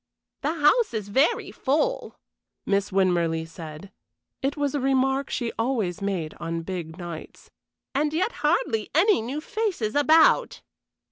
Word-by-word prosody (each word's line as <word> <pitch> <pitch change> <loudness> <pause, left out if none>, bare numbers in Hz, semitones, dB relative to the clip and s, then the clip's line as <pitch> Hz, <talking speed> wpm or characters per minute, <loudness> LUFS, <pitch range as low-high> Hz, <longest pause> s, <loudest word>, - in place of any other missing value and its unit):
"The 305 +3 -1
house 325 - +3
is 205 -2 -4
very 270 +10 +2
full," 320 - -1 0.5
Miss 200 0 +1
Winmarleigh 170 -4 +1
said 165 +3 -10 0.5
it 275 +3 -1
was 285 -1 0
a 290 - 0
remark 270 +1 +1
she 235 -2 -2
always 225 -7 -1
made 185 -6 -2
on 165 0 -3
big 170 -2 -6
nights 175 -3 -9 0.4
"and 295 +2 +1
yet 365 +9 0
hardly 225 - +1
any 385 - +4
new 255 +7 -4
faces 345 - -2
about." 310 +2 +4
240 Hz, 135 wpm, -25 LUFS, 180-295 Hz, 0.5 s, any